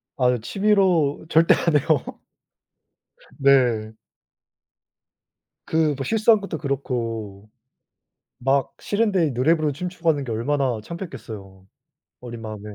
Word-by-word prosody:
아으 125 Hz, -2 st, +2 dB
취미로 185 Hz, -, +1 dB
절대 165 Hz, +1 st, +5 dB
안 165 Hz, -3 st, 0 dB
해요. 145 Hz, -1 st, +1 dB, 1.3 s
네. 125 Hz, -6 st, +3 dB, 1.7 s
그 160 Hz, -2 st, +1 dB
뭐 135 Hz, -, -3 dB
실수한 220 Hz, 0 st, +4 dB
것도 200 Hz, -5 st, -5 dB
그렇고 115 Hz, -8 st, -4 dB, 0.9 s
막 135 Hz, +2 st, 0 dB
싫은데 200 Hz, -7 st, +1 dB
노래 130 Hz, +8 st, +3 dB
부르고 155 Hz, -2 st, -1 dB
춤추고 175 Hz, +1 st, -3 dB
하는 145 Hz, -3 st, +1 dB
게 120 Hz, -, -5 dB
얼마나 125 Hz, +1 st, -1 dB
창피했겠어요 110 Hz, -, -9 dB, 0.6 s
어린 120 Hz, -2 st, -8 dB
마음에. 110 Hz, -2 st, -7 dB
140 Hz, 235 characters per minute, -23 LUFS, 120-165 Hz, 1.7 s, 절대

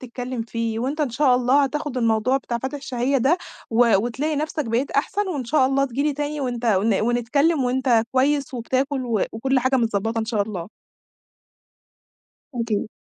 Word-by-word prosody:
تتكلم 250 Hz, -1 st, -5 dB
فيه، 230 Hz, -1 st, -3 dB
وأنت 270 Hz, +6 st, -2 dB
إن 285 Hz, -5 st, 0 dB
شاء 260 Hz, +1 st, +3 dB
الله 255 Hz, +3 st, +3 dB
هتاخد 280 Hz, 0 st, -3 dB
الموضوع 230 Hz, +2 st, +2 dB
بتاع 240 Hz, -3 st, -3 dB
فاتح 265 Hz, +4 st, -4 dB
الشهية 270 Hz, -1 st, 0 dB
ده، 280 Hz, +9 st, +3 dB, 0.3 s
و 230 Hz, -1 st, +4 dB
وتلاقي 265 Hz, +8 st, -1 dB
نفسك 305 Hz, 0 st, -2 dB
بقيت 235 Hz, +5 st, 0 dB
أحسن، 390 Hz, +8 st, 0 dB
وإن 285 Hz, -8 st, -3 dB
شاء 265 Hz, +1 st, +3 dB
الله 275 Hz, +1 st, +2 dB
تيجي 255 Hz, +2 st, -2 dB
لي 300 Hz, 0 st, +1 dB
تاني، 295 Hz, +1 st, -3 dB
وأنت 245 Hz, -3 st, -3 dB
و 215 Hz, +1 st, +2 dB
ونتكلم، 280 Hz, +5 st, +1 dB
وأنت 250 Hz, -2 st, +2 dB
كويس، 280 Hz, +2 st, +1 dB
وبتاكل، 260 Hz, +3 st, -1 dB, 0.3 s
وكل 265 Hz, +4 st, +1 dB
حاجة 260 Hz, +2 st, +2 dB
متضبطة 225 Hz, -1 st, 0 dB
إن 220 Hz, -, 0 dB
شاء 220 Hz, -3 st, 0 dB
الله. 200 Hz, -4 st, -6 dB, 1.9 s
أكيد، 230 Hz, -4 st, -1 dB
255 Hz, 165 wpm, -23 LUFS, 230-280 Hz, 1.9 s, و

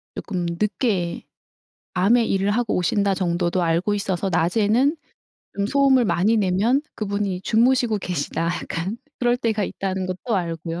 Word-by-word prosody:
쪼끔 180 Hz, -2 st, -3 dB
늦게 205 Hz, -4 st, -1 dB, 0.7 s
밤에 225 Hz, +6 st, +4 dB
일을 195 Hz, +1 st, +1 dB
하고 225 Hz, +1 st, 0 dB
오신다 195 Hz, +2 st, +1 dB
정도도 175 Hz, -1 st, 0 dB
알고 170 Hz, +5 st, +1 dB
있어서 195 Hz, -1 st, -1 dB
낮에는 220 Hz, -, +2 dB, 0.6 s
좀 200 Hz, 0 st, 0 dB
소음을 270 Hz, -1 st, +4 dB
많이 205 Hz, +6 st, +2 dB
내면 210 Hz, +7 st, +2 dB, 0.2 s
그분이 200 Hz, -3 st, -2 dB
주무시고 235 Hz, 0 st, +2 dB
계시다. 170 Hz, -2 st, -2 dB
약간 175 Hz, +4 st, -3 dB, 0.2 s
그럴 245 Hz, 0 st, +2 dB
때가 220 Hz, -4 st, -1 dB
있다는 190 Hz, -1 st, -3 dB
것도 185 Hz, +5 st, -3 dB
알고요. 165 Hz, -1 st, -3 dB
200 Hz, 310 characters per minute, -22 LUFS, 180-225 Hz, 0.7 s, 밤에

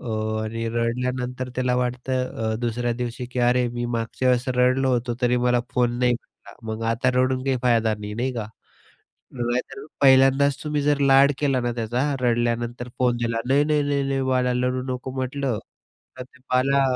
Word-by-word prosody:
अ, -, -, -10 dB, 0.4 s
आणि 115 Hz, +1 st, -3 dB
रडल्यानंतर 125 Hz, +2 st, -2 dB
त्याला 125 Hz, -1 st, 0 dB
वाटतं 125 Hz, -2 st, -2 dB
अ, -, -, -1 dB
दुसऱ्या 120 Hz, 0 st, -1 dB
दिवशी 120 Hz, +1 st, -4 dB
की 125 Hz, -, -4 dB
अरे 125 Hz, 0 st, +2 dB
मी 120 Hz, 0 st, -4 dB
मागच्या 115 Hz, +3 st, -1 dB
वेळेस 125 Hz, 0 st, +2 dB
रडलो 130 Hz, +1 st, +3 dB
होतो 120 Hz, 0 st, -1 dB
तरी 125 Hz, 0 st, +3 dB
मला 125 Hz, 0 st, +3 dB
फोन 120 Hz, -1 st, +1 dB
नाही 125 Hz, -1 st, +3 dB
भेटला. 120 Hz, -, -10 dB, 0.2 s
मग 110 Hz, +1 st, -5 dB
आता 125 Hz, +2 st, +1 dB
रडून 130 Hz, 0 st, +1 dB
काही 135 Hz, -1 st, +1 dB
फायदा 115 Hz, -3 st, +2 dB
नाही. 105 Hz, 0 st, -6 dB
नाही 125 Hz, +4 st, -1 dB
का? 110 Hz, -3 st, -3 dB, 0.9 s
नाहीतर 120 Hz, +1 st, -3 dB, 0.2 s
पहिल्यांदाच 135 Hz, +1 st, +5 dB
तुम्ही 150 Hz, -1 st, -1 dB
जर 145 Hz, 0 st, +2 dB
लाड 140 Hz, 0 st, +5 dB
केला 135 Hz, -3 st, +1 dB
ना 120 Hz, 0 st, -1 dB
त्याचा 120 Hz, +1 st, -2 dB, 0.2 s
रडल्यानंतर 120 Hz, 0 st, -1 dB
फोन 125 Hz, -1 st, +2 dB
दिला. 115 Hz, -1 st, -2 dB
नाही, 140 Hz, +2 st, +4 dB
नाही, 150 Hz, -1 st, +2 dB
नाही, 145 Hz, -1 st, 0 dB
नाही 135 Hz, 0 st, 0 dB
बाळा 130 Hz, -1 st, +1 dB
रडू 125 Hz, +1 st, 0 dB
नको 125 Hz, +1 st, -5 dB
म्हटलं. 130 Hz, -2 st, -2 dB, 0.6 s
तर -, -, -4 dB
ते 130 Hz, +2 st, -17 dB
बाला 135 Hz, +2 st, +3 dB
125 Hz, 175 wpm, -23 LUFS, 120-130 Hz, 0.9 s, पहिल्यांदाच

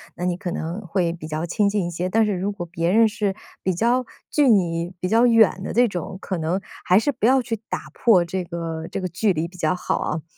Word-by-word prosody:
那 175 Hz, -, -6 dB
你 180 Hz, -1 st, 0 dB
可 180 Hz, -2 st, -4 dB
能 170 Hz, +4 st, -4 dB
会 175 Hz, -2 st, -1 dB
比 165 Hz, -2 st, -8 dB
较 155 Hz, +1 st, -3 dB
亲 200 Hz, +4 st, +1 dB
近 200 Hz, -3 st, 0 dB
一 175 Hz, -, -3 dB
些。 175 Hz, +2 st, -2 dB
但 220 Hz, +4 st, +3 dB
是 210 Hz, -, 0 dB
如 195 Hz, +2 st, -2 dB
果 175 Hz, -3 st, -5 dB
别 170 Hz, 0 st, -2 dB
人 225 Hz, +4 st, +5 dB
是 205 Hz, -2 st, -2 dB, 0.3 s
比 185 Hz, -, +1 dB
较 240 Hz, +6 st, +1 dB, 0.3 s
距 295 Hz, -2 st, +3 dB
你 175 Hz, -5 st, +2 dB
比 180 Hz, -, -1 dB
较 230 Hz, +3 st, +5 dB
远 225 Hz, -5 st, +4 dB
的 -, -, -4 dB
这 245 Hz, +2 st, +5 dB
种， 185 Hz, 0 st, -5 dB
可 185 Hz, -, -3 dB
能 165 Hz, +4 st, -1 dB, 0.3 s
还 180 Hz, -, +5 dB
是 285 Hz, +7 st, +2 dB
不 220 Hz, -, -2 dB
要 260 Hz, +2 st, +5 dB
去 230 Hz, -2 st, -3 dB
打 -, -, -5 dB
破 195 Hz, -7 st, +4 dB
这 180 Hz, +1 st, -3 dB
个 165 Hz, -1 st, -5 dB
这 -, -, -4 dB
个 185 Hz, -, -3 dB
距 190 Hz, +4 st, +1 dB
离 160 Hz, 0 st, -1 dB
比 180 Hz, +2 st, -10 dB
较 160 Hz, +1 st, +1 dB
好 180 Hz, -, -1 dB
啊。 155 Hz, 0 st, -3 dB
185 Hz, 270 characters per minute, -23 LUFS, 170-215 Hz, 0.3 s, 人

